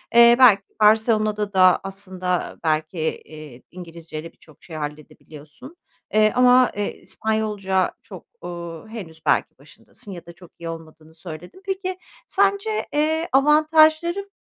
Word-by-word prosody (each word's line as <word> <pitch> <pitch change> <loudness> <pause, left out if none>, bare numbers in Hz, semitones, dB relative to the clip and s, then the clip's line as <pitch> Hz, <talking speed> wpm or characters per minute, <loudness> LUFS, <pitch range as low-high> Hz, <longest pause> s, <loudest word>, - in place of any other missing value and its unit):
Eee, 235 0 +8
belki 210 -6 +6 0.2
Barcelona'da 215 -1 +2
da 185 -1 +5
aslında 185 -2 -4
belki, 155 +1 -1
iii, 155 -5 -12
İngilizceyle 165 -2 -9
birçok 155 - -21
şey 165 - -10
halledebiliyorsun. 150 - -10 0.4
Eee, 215 0 +4
ama, 250 0 +5
eee, 205 0 -3
İspanyolca 210 -4 -1
çok, - - -12 0.2
ııı, 170 +1 -8
henüz 180 -8 -10
belki - - +1
başındasın 205 - -13
ya 175 -3 -9
da 170 - -12
çok 175 0 -17
iyi 170 - -6
olmadığını 160 -1 -11
söyledin. 165 - -11
Peki, 380 -1 -3 0.3
sence, 400 +2 0
eee, 315 +3 0
avantajları 310 +6 +3
195 Hz, 125 wpm, -22 LUFS, 165-255 Hz, 0.4 s, Eee